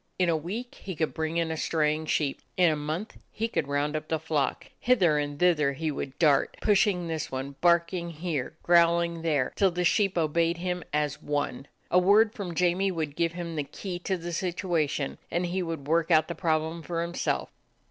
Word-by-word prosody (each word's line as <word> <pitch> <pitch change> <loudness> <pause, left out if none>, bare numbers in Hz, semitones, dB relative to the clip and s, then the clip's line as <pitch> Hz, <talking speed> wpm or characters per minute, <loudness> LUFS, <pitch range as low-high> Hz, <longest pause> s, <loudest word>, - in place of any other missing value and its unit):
In 180 -2 +2
a 165 - +3
week 205 +11 -5
he 190 -3 -6
could 160 0 -1
bring 160 +1 -2
in 165 -1 0
a - - -2
straying 155 0 0
sheep; 145 -3 0 0.2
in 180 -3 +5
a - - 0
month 155 +8 -4
he 225 +2 -2
could 160 -10 -2
round 145 +1 0
up 155 0 -3
the 160 - 0
flock. 155 -2 -1
Hither 185 -12 +3
and 145 0 -3
thither 150 -5 +3
he 155 +3 -2
would 140 -1 -5
dart, 145 -5 +3
pushing 200 -4 +2
this 160 -2 -3
one, 135 +1 -4
barking 170 0 +2
here, 160 -4 -3
growling 170 -1 +3
there, 150 -6 0
till 195 - +4
the 180 0 -2
sheep 195 +1 +2
obeyed 165 +1 +1
him 180 0 -3
as 150 -1 -1
one. 145 -2 -2 0.2
A 180 - +6
word 205 +4 +5
from 180 -5 -5
Jamie 180 +3 +2
would 160 -5 -3
give 170 0 0
him 170 -1 -5
the 150 - -1
key 175 +5 -6
to 190 +1 -2
the 170 0 -6
situation, 170 -6 -1
and 175 +1 0
he 180 +2 -1
would 165 -5 -4
work 165 +1 +2
out 155 -2 +4
the 170 - -3
prob 160 -3 +1
lem 165 +1 -6
for 170 +1 -2
himself. 170 +1 -2
165 Hz, 205 wpm, -27 LUFS, 150-180 Hz, 0.2 s, A